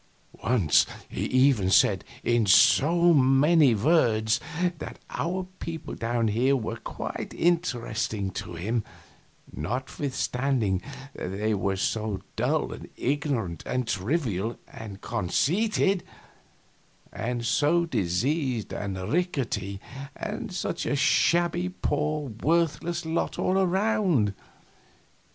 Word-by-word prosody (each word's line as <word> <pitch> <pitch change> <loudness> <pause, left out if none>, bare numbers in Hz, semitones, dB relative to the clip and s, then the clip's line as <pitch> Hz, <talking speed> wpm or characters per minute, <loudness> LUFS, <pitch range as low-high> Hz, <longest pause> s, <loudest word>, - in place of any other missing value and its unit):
Once 110 - +3 0.2
he - - -3
even 130 -7 +3
said, 95 - +4 0.2
in 120 -3 +2
so 170 - +5
many 135 0 +5
words, 110 -4 +3 0.4
that - - -7
our 185 +2 -2
people 165 -1 -6
down 115 0 -1
here 125 +6 +2
were 115 -2 -3
quite - - -6
interesting 115 - 0
to 90 -1 -6
him, 110 +7 -1 0.7
notwithstanding 125 - -1 0.3
they 105 +4 -2
were 95 -1 0
so 105 +1 -1 0.2
dull - - 0
and - - -10
ignorant 130 - -1
and 125 -2 -1
trivial 110 - -1
and 105 -3 -9
conceited, 180 - +1 1.1
and 120 0 -3
so 155 +7 +2
diseased 125 - -1
and 100 -2 -4 0.2
rickety, 120 - -1 0.4
and 215 0 -5
such 175 -1 -3
a - - +1
shabby, 175 +4 +2
poor, 150 -5 -2
worthless 170 +1 +1
lot 160 +1 -1
all 190 +1 +1
around. 185 - +2
130 Hz, 100 wpm, -26 LUFS, 110-165 Hz, 1.1 s, so